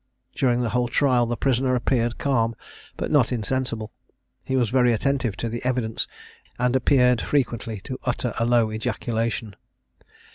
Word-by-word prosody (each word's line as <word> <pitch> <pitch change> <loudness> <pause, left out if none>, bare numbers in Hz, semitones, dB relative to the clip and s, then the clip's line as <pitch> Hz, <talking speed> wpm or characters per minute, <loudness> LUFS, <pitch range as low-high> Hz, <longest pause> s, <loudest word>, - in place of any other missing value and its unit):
During 125 -3 +1
the 120 - 0
whole 125 +1 +1
trial 125 -1 +2
the 120 0 -2
prisoner 130 -1 +1
appeared 120 -1 0
calm, 115 -5 +1 0.4
but - - -3
not 140 -5 +4
insensible. 115 -2 -2 0.5
He 130 - -2
was 120 -5 +1
very 125 -2 +4
attentive 130 -3 0
to 115 - -2
the 115 +1 -5
evidence, 125 -3 -1 0.5
and 125 +1 +1
appeared 125 -2 +4
frequently 120 -6 -1
to 130 +5 -6
utter 125 -2 -1
a 115 - +2
low 120 -2 +3
ejaculation. 110 -1 -2
120 Hz, 150 wpm, -24 LUFS, 115-130 Hz, 0.5 s, not